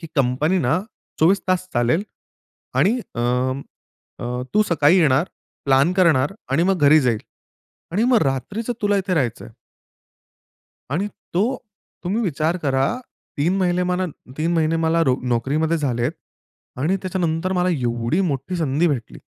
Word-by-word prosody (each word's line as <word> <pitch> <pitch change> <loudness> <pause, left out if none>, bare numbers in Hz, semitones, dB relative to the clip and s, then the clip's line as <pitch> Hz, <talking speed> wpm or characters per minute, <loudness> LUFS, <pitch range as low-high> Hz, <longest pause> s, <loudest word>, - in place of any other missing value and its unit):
"की 165 - -7
कंपनी 140 +8 +2
ना 125 - +3 0.5
24:00 190 +5 +5
तास 185 0 0
चालेल 120 - +2 0.8
आणि 200 - +4 0.3
अं, 125 +2 0 0.6
अ, - - -5 0.3
तू 215 - +4
सकाळी 165 +2 +5
येणार, 150 -1 +3 0.4
प्लान 140 +5 +4
करणार 160 -3 +3 0.2
आणि 165 - +3
मग 180 -6 0
घरी 155 +2 +7
जाईल 115 -3 +1 0.7
आणि 205 +6 +1
मग 235 - +5
रात्रीचं 210 - -4
तुला 205 -1 +2
इथे 190 -1 -1
राहायचं 130 - -1
आहे". - - -14 1.4
आणि 180 +9 0 0.3
तो 190 - +3 0.6
तुम्ही 205 +7 0
विचार 165 -2 0
करा 135 -1 +2 0.5
3 170 +7 +1
महिने 180 -1 +1
मला 180 +1 0 0.3
3 165 +2 0
महिने 165 0 +2
मला 165 0 +2
नो 130 - +4
नोकरीमध्ये 145 +8 +1
झालेत 130 -1 -1 0.7
आणि 170 +8 +1
त्याच्यानंतर 180 -1 -1
मला 180 -1 +1
एवढी 120 +1 0
मोठी 175 0 -2
संधी 155 +1 +1
भेटली. 130 -7 -3
160 Hz, 145 wpm, -21 LUFS, 135-185 Hz, 1.4 s, घरी